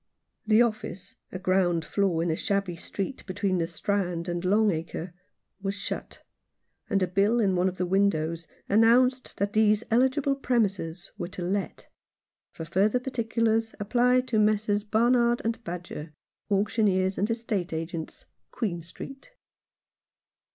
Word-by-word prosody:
The 220 +2 +6
office 215 -5 -4
— - - -47
a - - -4
ground 185 -3 +1
floor 185 -5 +1
in 170 - 0
a - - 0
shabby 195 -1 -1
street 195 +8 -5
between 185 -1 0
the 165 - 0
Strand 180 -1 -2
and 175 0 -2
Long 205 +3 +3
Acre— 165 +1 -5 0.5
was 195 0 -2
shut, 200 - -6 0.7
and 195 -1 +2
a - - +1
bill 200 +6 +2
in 195 -4 +2
one 180 +1 +2
of 185 - -9
the 180 - 0
windows 170 -4 +1 0.2
announced 245 +5 +3
that 200 +1 -1
these 215 0 +3
eligible 265 +4 +3
premises 200 -10 -1
were 175 - -3
to 185 -1 -6
let; 195 +3 -3 0.6
for 165 - -8
further 200 +8 +2
particulars 230 -3 0
apply 245 +4 +3
to 250 -4 -1
Messrs. 210 -1 +2
Barnard 235 +2 +3
and 230 0 -2
Badger, 170 -4 -7 0.4
Auctioneers 200 -2 +1
and 205 +4 +1
Estate 220 -5 -2
Agents, 160 0 -5 0.2
Queen 180 -8 -3
Street. 270 - -8
200 Hz, 145 wpm, -27 LUFS, 180-225 Hz, 0.7 s, The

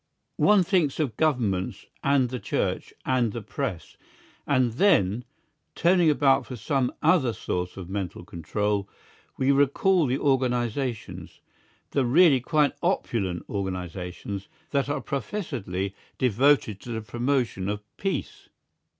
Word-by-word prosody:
One 205 -3 +5
thinks 175 -7 +1
of 135 -9 -1
Governments 115 - 0 0.2
and 140 -3 +3
the 125 0 -4
Church - - -2
and 125 -5 +1
the 115 - -5
Press, 115 - -5 0.5
and 130 -3 +3
then, 120 - +3 0.5
turning 175 -1 +4
about 135 -3 +3
for 125 - -6
some 125 +2 0
other 135 -10 +4
source 90 -2 -3
of 95 -3 -7
mental 95 -3 -4
control, 100 +4 -2 0.5
we 135 +1 +3
recall 145 +5 +3
the 130 +2 +1
organisations, 125 -3 -1 0.5
the 140 - +2
really 140 +2 +5
quite 150 +2 +2
opulent 110 - -1
organisations, 95 0 -5 0.2
that 140 -1 0
are 145 - -1
professedly 110 - -3 0.2
devoted 125 -3 +3
to 125 - -11
the 110 - -3
promotion 120 -4 -1
of 105 0 -3
peace. 195 -1 -4
125 Hz, 125 wpm, -26 LUFS, 100-140 Hz, 0.5 s, One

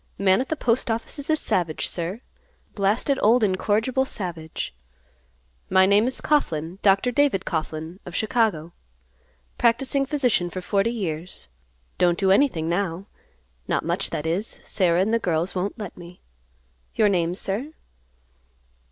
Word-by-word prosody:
Man 190 +2 +3
at 260 - -5
the 315 - 0
Postoffice 230 -1 -1
is 285 - -7
a 315 - +4
savage, 175 - -1
sir; 180 +6 -4 0.5
blasted, 220 +7 +1
old 230 +2 +4
incorrigible 215 +6 +1
savage. 170 - -5 1.0
My 190 0 +5
name 205 +4 +4
is 260 - -3
Coughlan; 175 - 0
Dr. 200 +5 +3
David 255 -7 +2
Coughlan, 160 +1 -4
of 180 - -9
Chicago; 215 -8 0 0.9
practicing 270 +3 +2
physician 250 - +1
for 185 - -5
forty 195 +4 +1
years; 175 - -5 0.5
don't 175 -1 +3
do 190 -2 +2
anything 195 - +3
now; 175 +1 -1 0.6
not - - 0
much, - - -1
that 150 - -4
is. 180 +7 0 0.2
Sarah 180 -3 +2
and 215 +4 +1
the 230 - +3
girls 170 -2 -1
won't 190 +4 -2
let 210 -5 -7
me. 175 0 -13 0.7
Your 215 - +4
name, 175 -3 +1
sir?" 210 +10 -3
195 Hz, 140 wpm, -24 LUFS, 175-230 Hz, 1.0 s, My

